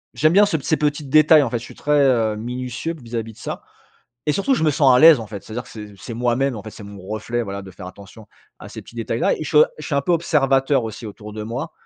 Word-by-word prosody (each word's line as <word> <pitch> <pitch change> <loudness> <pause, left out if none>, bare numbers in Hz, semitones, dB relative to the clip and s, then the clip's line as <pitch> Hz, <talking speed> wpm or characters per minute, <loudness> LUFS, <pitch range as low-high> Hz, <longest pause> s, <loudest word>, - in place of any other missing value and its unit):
j'aime 155 +2 +3
bien 205 +2 +6
ce 165 - 0
p 140 - -10
ces 160 - +1
petits 145 -1 -1
détails 155 +1 +5
en 120 - -2
fait, 120 - -1
je - - -12
suis - - -12
très, 150 0 +1
heu, 115 -6 +2
minutieux, 125 +7 -5
vis-à-vis 115 -1 -5
de - - -23
ça. - - -6 0.6
Et 150 - +2
surtout 200 - 0
je 160 - -2
me 155 - +3
sens 135 -3 +4
à 125 - +5
l'aise, 160 -3 +8
en 110 - -7
fait, 100 -1 -8
c'est-à-dire 120 +3 -6
que - - -17
c'est 105 -2 -10
c'est 95 +5 -9
moi-même, 125 +3 0
en 105 - -7
fait, 110 - -9
c'est 105 - -12
mon 100 -1 -10
reflet, 115 +3 -3
voilà, 100 -2 -6
de 95 - -11
faire 90 0 -11
attention 100 +3 -13 0.3
à - - -11
ces - - -9
petits - - -16
détails-là. 115 0 0
Et - - -5
je 150 - -5
suis 150 - -1
o 150 - +8
je 155 - -7
suis 150 - -3
un 140 - +1
peu 175 - 0
observateur 135 -5 +2
aussi 110 +1 -7
autour 105 0 -10
de 105 0 -6
moi. 125 +8 -5
125 Hz, 290 wpm, -21 LUFS, 110-150 Hz, 0.6 s, l'aise